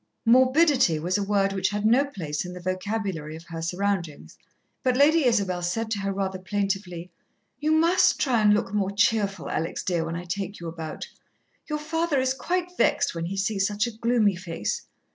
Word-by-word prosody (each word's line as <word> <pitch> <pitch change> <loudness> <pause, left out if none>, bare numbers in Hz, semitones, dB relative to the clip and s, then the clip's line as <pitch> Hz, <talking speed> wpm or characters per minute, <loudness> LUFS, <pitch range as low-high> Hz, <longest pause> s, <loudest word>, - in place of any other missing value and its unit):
Morbidity 260 - +4
was 175 +4 -1
a - - 0
word 195 -1 +1
which 190 -1 0
had 205 0 -2
no 240 +5 +5
place 160 - -4
in 180 0 -7
the 180 - -8
vocabulary 185 -3 -3
of 165 - -10
her 165 -1 -5
surroundings, 175 -2 -3 0.5
but 255 -2 +1
Lady 305 +2 +5
Isabel 195 -6 +1
said 220 +6 -2
to 205 - -1
her 195 0 -2
rather 190 -1 -3
plaintively, 190 -3 -3 0.5
"You 305 +2 0
must 335 +3 +4
try 245 -5 +2
and 210 -1 +5
look 210 -1 +1
more 200 -2 +1
cheerful, 200 -2 +1
Alex, 165 - -3
dear, 175 -3 0
when 165 +1 -4
I 170 - -5
take 195 +3 -4
you 170 - -6
about. 160 -1 -6 0.6
Your 300 - -2
father 320 -1 -1
is 260 0 +1
quite 360 +6 -2
vexed - - +2
when 165 0 -4
he 195 +2 -4
sees 195 0 +1
such 210 +1 0
a 235 - -4
gloomy 225 -3 +2
face. 170 - -4
200 Hz, 190 wpm, -25 LUFS, 180-240 Hz, 0.6 s, no